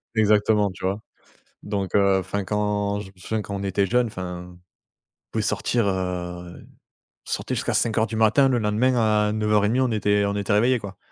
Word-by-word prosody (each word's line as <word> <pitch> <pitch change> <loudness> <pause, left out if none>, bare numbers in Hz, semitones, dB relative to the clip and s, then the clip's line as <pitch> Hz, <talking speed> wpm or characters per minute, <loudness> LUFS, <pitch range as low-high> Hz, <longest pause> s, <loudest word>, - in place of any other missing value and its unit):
Exactement, 105 -1 +3
tu 95 - -13
vois. 100 +3 -1 0.6
Donc 100 -3 -3
heu, 100 -1 +4
enfin, 95 +2 -3
quand 105 +1 -1
je 105 - -8
me - - -43
souviens 110 +4 -3
quand 100 - -6
on 100 - -4
était 100 0 0
jeune, 125 +2 +1
enfin, 90 -3 -7
on 90 - -16 0.7
pouvait - - -1
sortir, 120 -4 0
heu, 90 -2 -4
on - - -16 0.7
sortait - - -2
jusqu'à - - -2
5:00 110 -1 +1
du 110 - -5
matin 110 +5 +4
le 125 - +2
lendemain 110 +4 +1 0.3
à - - -1
9:30 105 +2 +1
on 130 -2 +1
était 105 -1 +1
on 100 0 -1
était 100 +1 -2
réveillé 120 +5 +3
quoi. 100 -2 -9
105 Hz, 190 wpm, -23 LUFS, 95-110 Hz, 0.7 s, heu